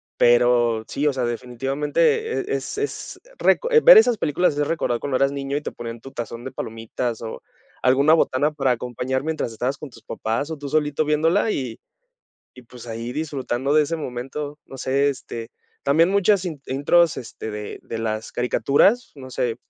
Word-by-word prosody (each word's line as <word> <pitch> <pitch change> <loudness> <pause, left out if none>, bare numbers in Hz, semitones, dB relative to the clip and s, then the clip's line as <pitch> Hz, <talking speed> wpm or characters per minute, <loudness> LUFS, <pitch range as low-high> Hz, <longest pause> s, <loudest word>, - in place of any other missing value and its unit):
Pero 120 -2 +3
sí, 145 - -2
o - - +4
sea, 130 -2 -2
definitivamente 145 - -1
e - - +2
es - - -5
es 425 0 -4 0.2
reco - - +2
eh, 460 - +6
ver - - +10
esas 245 - +5
películas 160 -1 +1
es 145 -1 +1
recordar 120 -7 -1
cuando 140 -2 -1
eras 135 +1 +2
niño 140 0 -3
y - - -3
te - - -5
ponían 115 0 -7
tu 135 +4 -11
tazón 120 -1 -6
de 130 - -5
palomitas, 115 +1 -4
o 110 - -6 0.4
alguna 140 +4 +4
botana 150 -2 +2
para 135 -3 +1
acompañar 125 +2 -2
mientras 155 -6 -2
estabas 125 +5 -2
con 150 - -8
tus 115 -3 -17
papás 115 +8 -3
o 160 - -4
tú 145 -1 -6
solito 150 0 +1
viéndola, 165 +8 +2
y 125 -4 -4 0.8
y 125 - -13
pues 120 0 -13
ahí 115 +1 -5
disfrutando 140 -2 -2
de 155 - +6
ese 160 +3 -2
momento, 145 +2 -5
no 135 - -11
sé, 135 +2 +1
este, 115 -4 -7 0.3
también 155 +5 +4
muchas 200 -1 +3
in 155 -5 -5
intros, 150 +5 +3
este, 115 -2 -7
de 105 -1 -6
de 115 - -6
las 110 -1 -3
caricaturas, 140 - +2
no 130 -3 -10
sé. 120 -2 -1
135 Hz, 185 wpm, -23 LUFS, 120-155 Hz, 0.8 s, ver